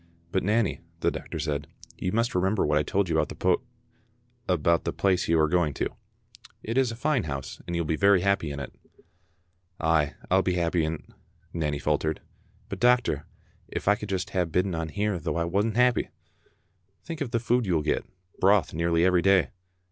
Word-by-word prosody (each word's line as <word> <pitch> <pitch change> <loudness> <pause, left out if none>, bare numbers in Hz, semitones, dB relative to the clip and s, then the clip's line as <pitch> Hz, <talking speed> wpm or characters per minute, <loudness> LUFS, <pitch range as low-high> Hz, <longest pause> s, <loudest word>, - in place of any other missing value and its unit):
"But 95 - +1
Nanny," 105 -3 +1 0.2
the - - +2
doctor - - -6
said, 75 -1 -2 0.3
"you 90 - -2
must 115 +3 0
remember 95 +3 +1
what 75 0 +2
I - - +3
told 95 +6 0
you 85 - -1
about - - +1
the - - -7
poo 90 -1 +2 0.4
—, 120 0 -25
about 85 +2 +2
the - - -1
place 95 -2 +1
you 80 0 +3
are 80 - +4
going 80 -3 +1
to. - - -1 0.7
It 115 - -3
is 130 -3 +2
a - - -6
fine 130 - 0
house, 70 -3 -5
and 85 - -3
you 85 - 0
will - - -6
be 80 - +1
very 100 -2 +5
happy 100 -5 +1
in 70 0 -5
it." 70 - -7 1.1
"Ay, 80 -3 +2 0.2
I'll 95 +1 +5
be 90 -1 0
happy 85 -1 +1
in't," 80 0 -4 0.5
Nanny 75 -3 -1
faltered, 75 +1 0 0.5
"but, - - -6
doc 125 0 +5
tor, 75 -1 -3 0.4
if - - -5
I 105 - +7
could 105 0 -6
just 95 +1 -2
hae 95 -2 +1
bidden 90 +3 0
on 80 -1 -3
here 105 +1 -1
though - - -3
I 85 - +1
wasna 100 +5 0
happy!" 125 -1 +3 0.5
" 95 +1 -44
Think 165 -2 -6
of 140 - -1
the 115 0 0
food 120 0 +1
you 90 - +2
will 75 - +1
get; 75 - 0 0.4
broth 95 -3 +3
nearly 85 +1 +2
every 90 -1 +4
day." 95 -1 +4
90 Hz, 210 wpm, -27 LUFS, 80-105 Hz, 1.1 s, I